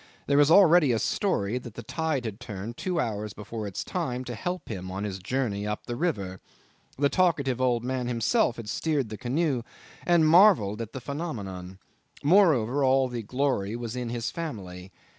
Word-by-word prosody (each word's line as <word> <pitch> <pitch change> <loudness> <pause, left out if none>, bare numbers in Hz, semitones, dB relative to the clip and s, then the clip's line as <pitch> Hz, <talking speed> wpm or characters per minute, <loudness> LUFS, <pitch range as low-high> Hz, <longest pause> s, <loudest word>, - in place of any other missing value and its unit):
There 140 0 +3
was 145 0 +5
already 170 -5 +6
a 115 - +2
story 120 - 0
that 120 -3 -11
the 120 - -7
tide 155 -1 -2
had 110 -1 -5
turned 110 -1 -7
two 180 +3 -2
hours 105 -5 -2
before 105 +1 -6
its 95 - -4
time 130 -9 -3
to 125 - -6
help 180 +9 -4
him 95 -4 -5
on 95 +2 -4
his 95 -2 -4
journey 105 -1 -2
up 105 0 -4
the 120 - -4
river. 100 - -2 0.6
The 140 +1 +3
talkative 140 -7 +1
old 120 -2 +2
man 125 -1 -2
himself 120 0 +1
had 115 -2 -8
steered 135 +3 -1
the 110 - -5
canoe 135 0 0 0.4
and 175 -2 +4
had - - +4
marvelled 160 - +5
at 115 -1 -7
the 130 - -6
phenomenon. 100 - -5 0.5
Moreover, 145 - +4
all 130 0 +3
the 120 -1 -4
glory 115 -3 -1
was 120 0 -5
in 125 -2 -3
his 120 -1 -3
family. 95 - -6
125 Hz, 185 wpm, -27 LUFS, 105-145 Hz, 0.6 s, already